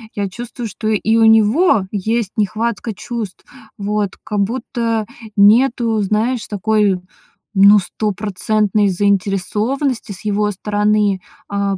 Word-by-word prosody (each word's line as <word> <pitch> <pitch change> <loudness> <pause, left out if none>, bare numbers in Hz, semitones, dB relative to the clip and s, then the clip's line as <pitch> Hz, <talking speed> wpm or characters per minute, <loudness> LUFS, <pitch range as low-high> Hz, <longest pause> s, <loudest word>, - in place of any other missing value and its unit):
я 200 -1 -2
чувствую, 240 +3 -7
что 215 +1 -6
и 220 +1 +1
у 225 - +5
него 220 - +4
есть 215 +1 -1
нехватка 220 +2 -1
чувств. 225 -3 -6 0.3
Вот, 205 -1 -1
как 210 -1 -3
будто 230 +1 -1 0.3
нету, 230 +2 +4
знаешь, 220 +4 -1
такой, 205 -2 +1 0.5
ну, 200 +1 +7
стопроцентной 210 +1 -1
заинтересованности 205 +7 -1
с 190 - -13
его 210 0 +1
стороны. 210 0 +1 0.3
А, 200 -1 -1
210 Hz, 110 wpm, -17 LUFS, 200-225 Hz, 0.5 s, ну